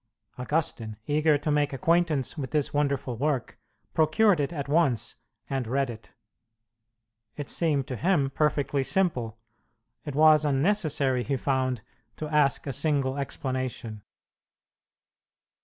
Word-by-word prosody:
Augustine, 125 -6 -2
eager 150 0 +3
to 150 +1 -2
make 145 -1 +1
acquaintance 155 0 +1
with 135 -4 -4
this 150 -3 -1
wonderful 140 -4 -1
work, 140 -1 -2 0.3
procured 160 +4 +3
it 140 +1 0
at 145 -5 -4
once 140 -9 +1 0.3
and 135 -4 -2
read 135 +1 0
it. 110 -1 -12 1.2
It 145 -2 -5
seemed 150 -6 0
to 130 - -5
him 145 -2 +1
perfectly 145 -2 +1
simple; 130 - 0 0.7
it 145 -3 -6
was 155 0 +6
unnecessary, 145 -3 +1
he 135 +1 -1
found, 130 -3 -1 0.3
to 155 - -5
ask 150 -2 +2
a 140 - -3
single 140 -2 0
explanation. 130 -5 -4
140 Hz, 125 wpm, -27 LUFS, 130-155 Hz, 1.2 s, was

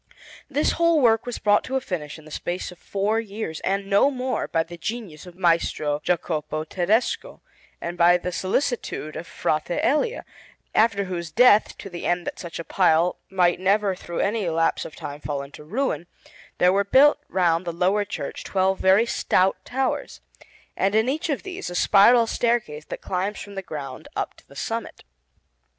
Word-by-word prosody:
This 290 +1 +1
whole 335 -1 +3
work 230 -3 +3
was 245 - -3
brought 205 0 +3
to 265 - -3
a - - +3
finish 165 - -5
in 155 - -15
the 155 - -13
space 175 +4 -4
of 180 - -15
four 205 +3 0
years, 205 -7 -5
and 195 +1 -1
no 200 +7 +4
more, 255 -1 -2
by 165 - +1
the 175 +1 -10
genius 180 -3 -6
of 175 - -12
Maestro 165 -4 +1
Jacopo 155 -3 -1
Tedesco 190 +8 0 0.4
and 175 +1 -6
by 175 +1 +6
the 180 +1 -4
solicitude 185 - -2
of 170 - -6
Frate 155 -1 -1
Elia, 300 - +1 0.5
after 215 -3 +3
whose 175 -3 -4
death, 225 -1 +5
to - - -8
the 175 -3 -5
end 175 0 0
that - - -5
such 170 -2 -7
a 165 - -5
pile 175 -1 +2
might 180 -2 +2
never 200 +1 +2
through 175 -2 -5
any 205 -3 0
lapse 165 0 +1
of - - -9
time 145 +1 -7
fall 140 -2 -3
into 140 +2 -12
ruin, 175 - -2 0.5
there 180 +1 +4
were 200 +1 +3
built 275 +9 +5
round 175 -2 +2
the 175 - -3
lower 185 +5 +1
church 205 - -6
twelve 190 0 +1
very 190 +4 +5
stout 190 -5 +2
towers, 260 +4 -2 0.6
and 195 +2 +1
in 220 +2 +3
each 315 +6 -1
of 285 - -1
these 365 - -6
a 175 - -6
spiral 220 +6 +6
staircase 225 -11 -1
that - - -7
climbs 195 +3 -2
from 205 - -9
the 195 - -4
ground 140 -7 -7
up - - -2
to - - -22
the - - -17
summit. - - -4
190 Hz, 185 wpm, -24 LUFS, 170-225 Hz, 0.6 s, by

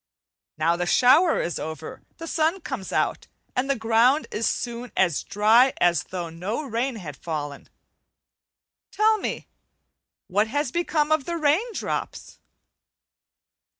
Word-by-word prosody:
Now 165 +2 +2
the 175 0 -2
shower 290 - +5
is 170 - -2
over, 160 0 -7 0.2
the 330 - -7
sun 330 +3 0
comes 260 -11 -6
out - - -1 0.3
and 255 +2 0
the 275 - +2
ground 230 +5 +3
is 225 - -1
soon 240 0 -3
as 175 -6 +2
dry 225 +6 +4
as 175 -1 +2
though 175 -3 -5
no 190 - -4
rain 245 +1 -2
had 160 -9 -8
fallen. 145 -3 -6 1.2
Tell 435 0 +2
me; - - -4 0.8
what 205 +3 +1
has 290 +2 -1
become 310 -2 0
of 310 -4 +2
the 340 0 -3
rain 325 +10 +1
drops? - - -5
240 Hz, 135 wpm, -24 LUFS, 180-300 Hz, 1.2 s, shower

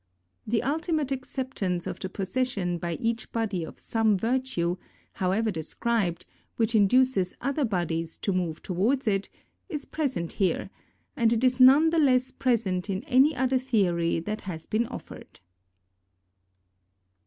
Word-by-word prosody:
The 225 +2 +1
ultimate 305 0 -1
acceptance 255 -9 -3
of - - -5
the 190 - -4
possession 195 -3 -2
by 170 0 -3
each 230 +2 -2
body 215 -7 -1
of 160 - -9
some 220 -3 +1
virtue, 225 -6 0 0.4
however 200 +4 0
de 165 -4 -4
scribed, 185 0 -1 0.3
which 225 0 +1
induces 215 -2 +3
other 275 +2 0
bodies 165 -5 -2
to 195 - +1
move 175 -4 -2
towards 225 +10 0
it, 195 -1 0 0.4
is 295 -3 -4
present 255 - -2
here, 190 -3 -1 0.4
and 230 -5 +3
it 235 +1 +1
is 255 0 +3
none 280 +5 +7
the 330 - +2
less 255 -3 +3
present 210 -7 0
in 195 +3 -2
any 280 +1 +4
other 260 0 +1
theory 180 -10 +1
that 215 +6 -4
has 165 -5 -6
been 225 +2 0
offered. - - -10
225 Hz, 140 wpm, -27 LUFS, 185-260 Hz, 0.4 s, none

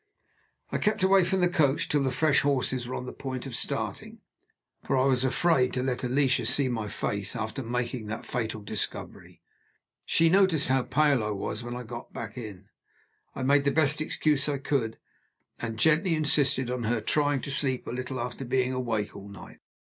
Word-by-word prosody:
I - - -1
kept 210 -3 +1
away 190 0 +5
from 185 +2 0
the 180 - +5
coach 150 -5 +2
till 145 - +1
the 135 - +1
fresh 150 +1 +3
horses 130 -3 0
were 130 - -4
on - - -4
the - - -7
point 130 -1 -5
of 130 -3 -6
starting, - - -3 0.6
for 135 - 0
I 130 - +3
was 130 -2 +2
afraid 130 -1 +2
to 125 - -1
let 130 -1 -2
Alicia 125 -2 +2
see 135 +2 +2
my 110 -3 -2
face, 100 +1 -2
after 110 +4 -3
making 120 -1 -3
that 110 +2 -5
fatal 110 -3 -3
discovery. 105 +1 -6 0.6
She 165 - +3
noticed 175 -5 +3
how 130 0 +3
pale 135 -1 +2
I 105 - -2
was 105 +2 -3
when 120 0 -5
I 125 - -5
got 120 0 -8 0.3
in. 105 -6 -8 0.7
I 130 - -4
made 140 +2 +4
the 140 - +3
best 150 0 +2
excuse 150 -2 +1
I 145 - 0
could; 135 -5 -1 0.6
and 115 -1 -4
gently 160 - +3
insisted 140 -4 +2
on 125 -2 -2
her 115 +1 +1
trying 145 +4 +1
to 140 - -5
sleep 135 -2 0
a - - -5
little 130 +1 -4
after 125 +3 -4
being 130 0 0
awake 115 -5 -2
all 100 0 -9
night. 100 -3 -12
130 Hz, 190 wpm, -28 LUFS, 120-145 Hz, 0.7 s, away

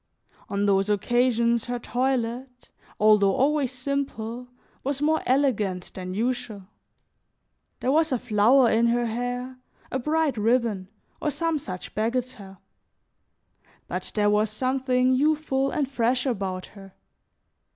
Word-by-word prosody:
On 200 0 0
those 195 0 +2
occasions 235 +2 +2
her 245 0 -3
toilet, 250 0 -2 0.3
although 210 -2 +5
always 285 -1 +1
simple, 250 -3 -4 0.4
was 275 0 -2
more 310 +2 +2
elegant 215 -9 +1
than 185 0 -6
usual; 235 -2 -2 1.2
there 260 - +1
was 320 +1 +2
a 255 - +2
flower 240 +2 +4
in 230 +1 +3
her 240 +1 +1
hair, 245 +2 -4 0.3
a 265 - -1
bright 300 0 0
ribbon, 220 -3 +1 0.3
or 305 - 0
some 330 +1 -1
such 185 -8 -8
bagatelle; 220 -3 -3 1.3
but - - -5
there 205 -1 +3
was 210 +1 +2
something 255 +2 +1
youthful 275 -1 +1
and 285 -1 -1
fresh 250 -1 0
about 195 -7 -2
her. 195 -2 -13
245 Hz, 120 wpm, -25 LUFS, 215-265 Hz, 1.3 s, although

